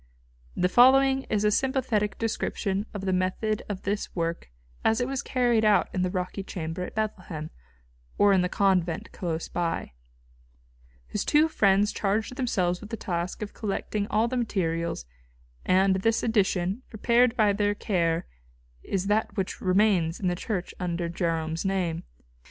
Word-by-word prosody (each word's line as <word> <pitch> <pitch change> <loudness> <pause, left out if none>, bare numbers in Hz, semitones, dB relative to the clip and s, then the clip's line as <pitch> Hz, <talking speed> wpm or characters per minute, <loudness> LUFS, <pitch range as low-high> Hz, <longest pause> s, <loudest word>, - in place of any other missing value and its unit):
The 180 - +2
following 265 +5 +5
is 210 -1 +1
a 210 - +3
sympathetic 245 -4 0
description 210 -2 -2
of 205 - -5
the 190 - +1
method 185 +4 0
of 195 -2 -4
this 205 +1 -3
work 165 - -2 0.3
as 220 - +3
it 245 - 0
was 270 -1 -2
carried 240 -3 +1
out 210 -1 +4
in 185 - -1
the 185 - +1
rocky 185 +1 -3
chamber 170 -3 -5
at 180 - -6
Bethlehem, 185 -8 -4 0.7
or 205 -1 +5
in 190 - +4
the 180 - 0
convent 180 -5 +1
close 165 -3 -3
by: 170 - -2 1.1
His - - -3
two 300 +2 +4
friends 205 -8 +3
charged 215 +4 -1
themselves 185 -9 0
with 215 - -9
the 225 - -4
task 175 +1 -3
of 205 - -7
collecting 205 0 -3
all 220 +2 +2
the 255 +1 -2
materials, 170 - -1 0.6
and 190 +1 +4
this 225 +4 +1
edition, 200 -2 +1
prepared 235 +2 +2
by 210 -3 +4
their 205 0 +1
care, 170 -5 0 0.6
is 195 - -2
that 210 +2 0
which 190 -1 -3
remains 185 -3 +2
in 185 - 0
the 175 - -1
Church 185 -1 -4
under 175 -2 -2
Jerome's 165 -2 -2
name.... 185 -4 -1
195 Hz, 155 wpm, -27 LUFS, 180-220 Hz, 1.1 s, following